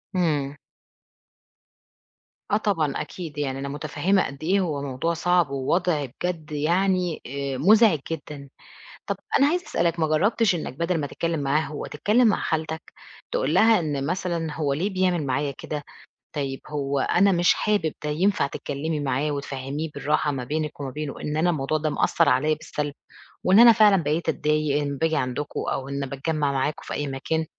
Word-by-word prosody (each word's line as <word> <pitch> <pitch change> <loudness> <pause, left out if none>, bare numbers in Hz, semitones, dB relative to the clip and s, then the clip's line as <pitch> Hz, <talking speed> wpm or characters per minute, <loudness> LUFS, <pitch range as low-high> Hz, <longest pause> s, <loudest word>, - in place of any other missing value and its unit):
إمم. 145 -6 0 2.0
آه 205 - +4
طبعًا، 165 -10 0
أكيد. 165 -5 -7
يعني 135 -2 -2
أنا 140 +1 -4
مُتفهِّمة 185 +6 0
قد 140 +2 -8
إيه 190 +5 +2
هو 155 -7 -1
موضوع 140 +4 -2
صعب 175 -1 +2
ووضع 145 +3 0
بجد 155 +4 -5
يعني 175 +3 +1
آآ 140 0 -3
مُزعج 205 - +5
جدًا. 145 -3 -6 0.6
طَب - - -1 0.2
أنا 275 - +5
عايزة 355 +4 0
أسألك 170 0 0
ما 160 - +3
جرّبتش 205 +7 +2
إنّك 160 -7 -4
بَدَل 170 +1 0
ما 145 - -2
تتكلِّم 165 +2 -2
معاه 140 +2 +2
هو، 155 -2 -5
تتكلِّم 215 +11 +2
مع 205 - +1
خالتك؟ 160 0 -3 0.4
تقول 145 +4 0
لها 220 +4 +6
إن 145 -4 -2
مثلًا 170 -2 -2
هو 145 -3 0
ليه 170 +9 -1
بيعمل 185 -5 +1
معايا 140 +2 0
كده؟ 150 -1 -5 0.5
طيب، 135 -3 -3
هو 140 -2 -1
أنا 195 +8 +3
مش 175 -1 +4
حابب 205 -8 0
ده، 150 - -1
ينفع 185 +5 +2
تتكلِّمي 150 +2 -3
معاه 140 +2 0
وتفهميه 140 +2 -4
بالراحة 150 0 0
ما 130 -3 -3
بينِك 150 +2 -3
وما 135 -2 -3
بينه 150 +1 -5
إن 150 0 -3
أنا 170 +3 +3
الموضوع 155 -1 0
ده 155 0 -1
مأثّر - - +2
عليّا 155 +4 +3
بالسلب 150 -2 -4 0.5
وإن 190 +3 +5
أنا 235 0 +10
فعلًا 210 -3 +6
بقيت 155 +3 0
أتضايق 150 -1 +1
إن 140 -1 -3
باجي 160 +1 +1
عندكم 130 +3 -2
أو 135 0 -3
إن 140 0 -2
باتجمّع 145 +2 -1
معاكم 140 +2 -1
في - - -6
أي 145 - -2
مكان؟ 150 +4 -2
155 Hz, 170 wpm, -24 LUFS, 140-175 Hz, 2.0 s, أنا